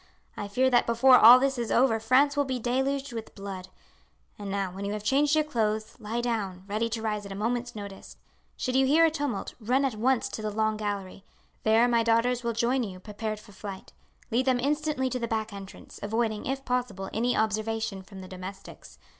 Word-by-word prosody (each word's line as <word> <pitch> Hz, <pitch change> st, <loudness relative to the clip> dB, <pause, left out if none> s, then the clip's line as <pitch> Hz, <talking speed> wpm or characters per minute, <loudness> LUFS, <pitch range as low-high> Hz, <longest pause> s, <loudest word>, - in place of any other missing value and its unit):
I 205 Hz, -, -5 dB
fear 255 Hz, +6 st, +2 dB
that 240 Hz, -, +4 dB
before 250 Hz, +2 st, +6 dB
all 235 Hz, +3 st, +10 dB
this 270 Hz, -1 st, 0 dB
is 235 Hz, -2 st, -2 dB
over 235 Hz, -3 st, +3 dB
France 260 Hz, +6 st, +3 dB
will 290 Hz, -, +2 dB
be 260 Hz, -2 st, -2 dB
deluged 265 Hz, +3 st, -1 dB
with 225 Hz, -1 st, -7 dB
blood. 195 Hz, -2 st, -7 dB, 0.7 s
And 205 Hz, -1 st, -5 dB
now, 195 Hz, -1 st, -2 dB
when 195 Hz, +2 st, -7 dB
you 200 Hz, +1 st, -2 dB
have 210 Hz, -1 st, -5 dB
changed 285 Hz, +6 st, +3 dB
your 310 Hz, -, +3 dB
clothes, 220 Hz, -6 st, -1 dB
lie 225 Hz, +2 st, -3 dB
down, 205 Hz, -6 st, -2 dB
ready 215 Hz, +3 st, -1 dB
to 225 Hz, -1 st, -4 dB
rise 210 Hz, -2 st, -2 dB
at 200 Hz, -, -9 dB
a -, -, -5 dB
moment's 240 Hz, +3 st, -2 dB
notice. 200 Hz, -2 st, -9 dB, 0.4 s
Should 255 Hz, -1 st, -2 dB
you 265 Hz, 0 st, +4 dB
hear 320 Hz, +4 st, +5 dB
a 325 Hz, -, +3 dB
tumult, 285 Hz, -9 st, -3 dB
run 250 Hz, +5 st, +1 dB
at 265 Hz, -, 0 dB
once 240 Hz, +3 st, +1 dB
to -, -, -6 dB
the 215 Hz, -, -2 dB
long 215 Hz, +1 st, 0 dB
gallery. 200 Hz, -3 st, -4 dB, 0.4 s
There 225 Hz, +2 st, +4 dB
my 235 Hz, -1 st, +3 dB
daughters 235 Hz, +2 st, +2 dB
will 235 Hz, 0 st, -1 dB
join 240 Hz, +3 st, +1 dB
you 190 Hz, -6 st, -5 dB
prepared 215 Hz, +2 st, -5 dB
for 215 Hz, -, -16 dB
flight. 195 Hz, -1 st, -9 dB, 0.4 s
Lead 255 Hz, +4 st, +1 dB
them 255 Hz, -1 st, +3 dB
instantly 295 Hz, 0 st, 0 dB
to 250 Hz, -, -2 dB
the 235 Hz, -, -2 dB
back 220 Hz, -1 st, -2 dB
entrance, 195 Hz, -1 st, -10 dB
avoiding, 220 Hz, +1 st, -1 dB
if 270 Hz, +1 st, -3 dB
possible, 245 Hz, -6 st, -2 dB
any 240 Hz, +3 st, +1 dB
observation 220 Hz, -2 st, -1 dB
from 190 Hz, 0 st, -11 dB
the 185 Hz, -, -9 dB
domestics. 185 Hz, +1 st, -10 dB
225 Hz, 210 wpm, -27 LUFS, 205-255 Hz, 0.7 s, all